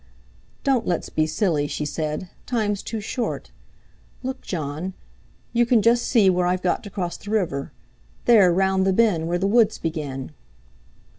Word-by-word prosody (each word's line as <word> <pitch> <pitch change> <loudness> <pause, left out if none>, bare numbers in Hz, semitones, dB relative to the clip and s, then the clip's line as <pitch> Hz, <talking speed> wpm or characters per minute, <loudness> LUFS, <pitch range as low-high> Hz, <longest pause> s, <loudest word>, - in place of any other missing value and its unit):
"Don't 265 -5 +1
let's 175 - -1
be 155 0 +1
silly," 155 -4 0
she 150 - -3
said, 155 +3 -3 0.2
"time's 210 -5 0
too 225 - -4
short. 230 +3 -4 0.7
Look, 260 +1 -4
Jon, 160 +2 -4 0.6
you 240 0 +4
can 235 -3 +3
just 235 +1 +4
see 225 -6 +4
where 180 -1 +3
I've 180 0 0
got 180 - +1
to - - -6
cross 180 -3 -3
the 205 - -10
river. 175 -11 -1 0.5
There, 205 -7 +6
round 190 +1 +2
the 190 - +3
bend, 185 -7 +2
where 175 +1 0
the 190 - -1
woods 220 +1 +4
begin." 150 -5 -4
190 Hz, 160 wpm, -23 LUFS, 165-220 Hz, 0.7 s, There